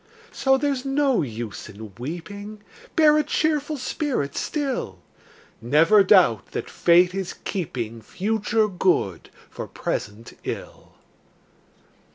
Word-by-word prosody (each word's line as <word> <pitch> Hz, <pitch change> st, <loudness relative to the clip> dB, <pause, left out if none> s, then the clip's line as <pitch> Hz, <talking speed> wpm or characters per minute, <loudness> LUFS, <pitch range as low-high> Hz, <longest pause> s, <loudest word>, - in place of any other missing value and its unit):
So 265 Hz, 0 st, +2 dB
there's 275 Hz, -2 st, -1 dB
no 275 Hz, -2 st, +2 dB
use 115 Hz, -6 st, -6 dB
in 105 Hz, 0 st, -10 dB
weeping, 200 Hz, -, -7 dB, 0.3 s
Bear 305 Hz, -2 st, +6 dB
a -, -, +2 dB
cheerful 305 Hz, -1 st, 0 dB
spirit 255 Hz, -, -2 dB
still; 270 Hz, -, -2 dB, 0.6 s
Never 160 Hz, -, +5 dB
doubt 185 Hz, -, +4 dB
that -, -, -4 dB
Fate 175 Hz, +1 st, +4 dB
is 190 Hz, -2 st, -3 dB
keeping 120 Hz, -, -4 dB
Future 215 Hz, -, 0 dB
good 180 Hz, -, 0 dB, 0.2 s
for -, -, -7 dB
present 105 Hz, +2 st, -5 dB
ill! -, -, -7 dB
195 Hz, 110 wpm, -24 LUFS, -, 0.6 s, Bear